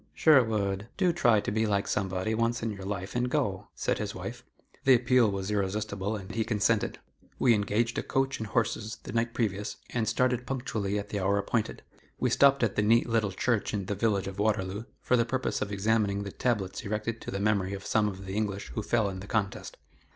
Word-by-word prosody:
"Sherwood, 110 -9 +3
do 185 -3 +3
try 120 -10 +4
to - - -3
be 110 +1 +1
like 100 -1 0
somebody, 95 +2 -1
once 115 +1 0
in 115 - -1
your 100 -2 -8
life, 100 0 -4
and 125 0 +1
go," 105 -9 -1
said - - -1
his - - -3
wife. - - -6 0.4
The 135 -1 +7
appeal 125 -1 +4
was 100 0 -3
irresistible, 105 +1 -1
and 95 -2 -7
he 115 - +1
consented. 110 -1 +1 0.4
We 125 - +5
engaged 105 +2 +1
a - - 0
coach 135 0 0
and 110 - -4
horses 110 +1 -1
the - - -7
night 115 0 0
previous, 105 -3 -1 0.2
and 115 -3 0
started 125 +1 +1
punctually 110 -6 -2
at 105 0 -4
the 105 - -2
hour 100 +1 +2
appointed. 105 +2 -1 0.4
We - - +1
stopped 140 -2 +5
at 110 - +1
the - - +2
neat 115 +3 +4
little 115 -3 +1
church 110 +2 0
in 100 -2 -2
the 100 - -2
village 100 -1 +1
of 95 +1 -6
Waterloo, 105 0 0 0.2
for 125 - +2
the 120 - +4
purpose 130 +2 -2
of 105 - -2
examining 100 0 +1
the 100 - -6
tablets 100 -6 -1
erected 105 +2 -3
to - - -7
the 100 - -3
memory 100 -2 +1
of 95 -1 -6
some 110 -1 +2
of 95 -1 -6
the 95 - -5
English 100 -2 -2
who 110 - -3
fell 110 -1 +1
in 95 -1 -4
the 100 - -9
contest. 100 -3 -2
105 Hz, 215 wpm, -29 LUFS, 100-115 Hz, 0.4 s, The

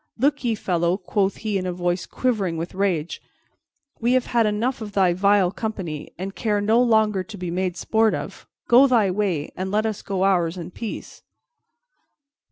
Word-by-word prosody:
"Look 285 +4 +1
ye, 235 -2 +1
fellow," 175 -2 0
quoth 195 +1 0
he 205 -2 0
in 185 - -3
a - - -1
voice 175 0 -2
quivering 205 -10 -1
with 165 +2 -5
rage, 185 -5 -1 0.8
"we 240 +2 +2
have 255 -1 +2
had 230 -2 +2
enough 230 +5 -1
of 210 -2 -7
thy 185 -3 +3
vile 195 0 +3
company, 190 -8 -5
and 190 +2 -5
care 210 -1 0
no 220 +4 +3
longer 220 -5 +3
to 205 +3 -10
be 180 -2 -4
made 180 0 -2
sport 220 +4 +2
of. - - -7 0.2
Go 255 +4 +7
thy 225 -7 +3
way, 180 -7 -1
and 185 +1 -3
let 210 +2 +1
us 215 -2 -2
go 190 -1 -2
ours 180 -3 +2
in 175 0 -7
peace." 225 +3 -7
200 Hz, 180 wpm, -23 LUFS, 180-220 Hz, 0.8 s, Go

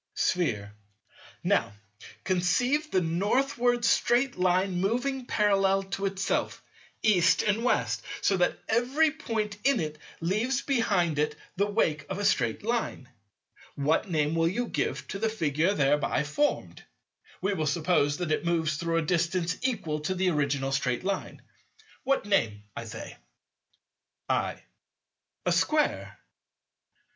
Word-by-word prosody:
Sphere. 105 - 0 0.7
Now - - +1 0.5
conceive 245 - +1
the 185 - +2
Northward 240 +8 +1
straight 245 +3 +2
Line 180 0 +1
moving 250 +5 -1
parallel 195 -2 +2
to 195 0 0
itself, 195 -1 -2 0.4
East 185 -4 +4
and 215 +2 +1
West, 250 - +1 0.2
so 195 - +2
that 180 - +1
every 260 +8 +2
point 215 -5 -3
in 275 -3 +3
it 155 -2 -4 0.2
leaves 220 +10 0
behind 195 - +1
it 150 0 0 0.2
the 200 +2 +1
wake 155 -9 0
of 190 - -3
a 205 - -2
straight 200 - +1
Line. 225 - -2 0.7
What 155 +7 +1
name 155 -2 +1
will 165 0 +2
you 240 +8 -1
give - - -2
to 195 - -4
the 225 +1 +1
Figure 165 -2 0
thereby 145 +1 +2
formed? 285 - -1 0.6
We 200 +2 0
will 155 -5 -1
suppose 155 -2 +1
that 175 -3 -3
it - - 0
moves 160 -3 0
through 165 0 -1
a 165 - +1
distance 170 +1 0
equal 195 -12 -1
to 160 +5 -2
the 185 0 +1
original 140 -3 0
straight 125 -1 0
line. 195 0 -3 0.6
—What 270 -5 +1
name, 115 - +1
I - - -5
say? - - -8 1.1
I. - - -1 0.8
A - - +2
square. - - +1
185 Hz, 135 wpm, -28 LUFS, 155-225 Hz, 1.1 s, East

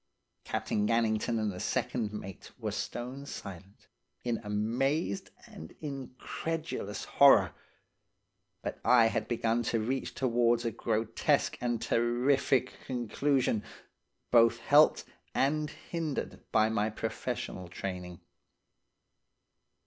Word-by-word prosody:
"Captain 105 0 -1
Gannington 115 0 +1
and 105 -1 0
the 90 - -7
second 110 +1 -1
mate 95 -3 -8
were - - -3
stone 130 +4 -5
silent, 100 -4 -9 0.4
in 120 -2 -1
amazed 110 - -1 0.2
and 80 - -11
incredulous 140 -2 -4
horror, 120 - +6 1.1
but - - -4
I 120 -2 +6
had 105 - -2
begun 115 0 +1
to 115 - +1
reach 130 +5 -2
towards 120 -2 +2
a 115 - 0
grotesque 110 +1 0
and 120 -2 0
terrific 125 +3 +2
conclusion, 125 -1 0 0.7
both 115 -1 +6
helped 145 +6 +5 0.3
and 150 +2 +1
hindered 160 -3 -5
by 110 -1 +4
my 110 -1 +1
professional 95 -3 -4
training. 90 -1 -6
115 Hz, 105 wpm, -31 LUFS, 105-135 Hz, 1.1 s, horror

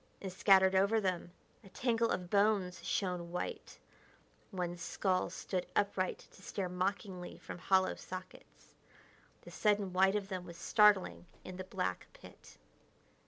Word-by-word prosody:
And, 190 -2 -6
scattered 190 -1 +5
over 200 +4 +3
them, 185 -4 -2 0.3
a 195 - -14
tangle 230 +3 +1
of 180 -1 -3
bones 200 -3 +2
shone 180 -3 -2
white; 180 - -5 0.7
one 180 -3 -3
skull 185 +1 -1
stood 185 -2 -4
upright 195 -2 0
to - - -17
stare 190 -3 -4
mockingly 185 0 -3
from - - -9
hollow 190 0 +3
sockets. 185 0 -10 0.7
The - - -11
sudden 205 -3 +1
white 190 +2 +4
of 205 -2 -1
them 185 -2 -4
was 170 -2 -10
startling 210 -4 +3 0.2
in 185 - -8
the 185 - -4
black 95 - -3
pit. - - -15
190 Hz, 140 wpm, -34 LUFS, 180-200 Hz, 0.7 s, scattered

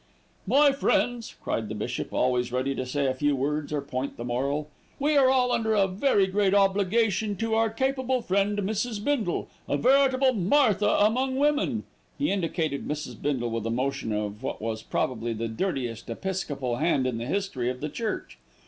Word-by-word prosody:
"My 280 +6 +5
friends," 245 -3 0
cried 110 -2 -2
the 110 - -4
bishop, 120 +3 -4
always 125 -1 +1
ready 130 +2 0
to 130 -1 -4
say 140 +2 -1
a 130 - +2
few 145 +2 +1
words 145 +3 -2
or 150 -1 -1
point 135 0 -4
the 120 - -5
moral, 140 +5 -1 0.3
"we 295 +2 +1
are 270 -2 +6
all 255 -1 +3
under 220 -2 +1
a 200 -2 +4
very 195 +1 +2
great 195 +1 +1
obligation 200 +1 +2
to 225 +2 -2
our 225 0 +3
capable 260 +1 0
friend 200 +2 +1
Mrs. 215 +3 -1
Bindle, 240 -11 0 0.2
a - - +1
veritable 265 0 +4
Martha 210 0 +3
among 255 +7 +2
women;" 295 +2 +1 0.3
he 290 - 0
indicated 165 -6 -1
Mrs. 150 0 -5
Bindle 130 -5 -1
with 115 -1 -2
a - - -1
motion 125 -1 -1
of 105 0 -3
what 135 - -4
was 110 0 -3
probably 115 0 -2
the 115 +1 -3
dirtiest 120 - -3
episcopal 140 -4 -3
hand 150 -3 +1
in 125 -3 -1
the 120 - -4
history 155 -9 -1
of 125 0 -4
the 150 - -3
Church. 215 +8 -4
185 Hz, 180 wpm, -27 LUFS, -, 0.3 s, are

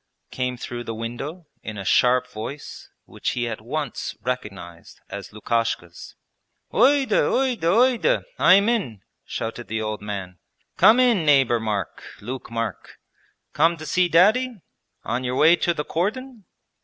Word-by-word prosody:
came 125 -1 -2
through 120 0 -6
the 115 -1 -5
window 135 +10 -6 0.2
in 110 -1 -7
a 100 - -6
sharp 125 +4 +3
voice, 125 +7 -8 0.2
which - - -4
he 120 -1 0
at 110 -2 -5
once 140 +3 -4
recognized 100 -9 -6
as 100 0 -7
Lukashka's. 105 -5 -3 0.6
'Uyde, 270 +3 +4
Uyde, 260 -3 +1
Uyde. 245 - +3 0.2
I 185 - +7
am 200 +2 +3
in!' 185 - -1 0.2
shouted 115 +1 -5
the 110 +1 -2
old 110 -1 -4
man. 95 -4 -6 0.4
'Come 225 +3 +6
in, 240 -8 +3
neighbour 135 -5 +4
Mark, 110 -2 -3 0.2
Luke 125 +5 -7
Mark. 115 0 -5 0.6
Come 165 +3 +3
to 155 - -8
see 180 +4 +2
Daddy? 220 +9 +4 0.5
On 120 +3 -2
your 125 0 -2
way 160 +5 +6
to 175 - +1
the 150 -3 -3
cordon?' 220 +5 -3
130 Hz, 145 wpm, -23 LUFS, 110-185 Hz, 0.6 s, I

